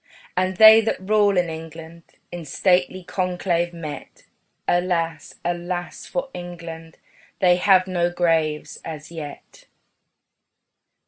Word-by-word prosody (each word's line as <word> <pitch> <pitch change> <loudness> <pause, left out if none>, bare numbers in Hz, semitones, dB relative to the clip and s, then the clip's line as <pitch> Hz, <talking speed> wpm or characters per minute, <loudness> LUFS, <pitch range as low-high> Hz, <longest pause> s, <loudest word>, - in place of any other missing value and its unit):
And 185 0 0
they 220 +1 +9
that 225 - -1
rule 205 -2 +3
in 175 -1 +2
England, 165 +1 -9 0.3
In 175 -1 -6
stately 180 +4 +1
conclave 175 -1 -1
met, 165 -3 -9 0.4
Alas, 170 -3 -1
alas 175 0 -4
for 265 0 -4
England 165 -2 -8 0.4
They 180 -2 +4
have 185 0 +4
no 175 -2 0
graves 165 -3 0
as 155 -1 -8
yet. 155 -4 -10
175 Hz, 110 wpm, -22 LUFS, 165-185 Hz, 0.4 s, they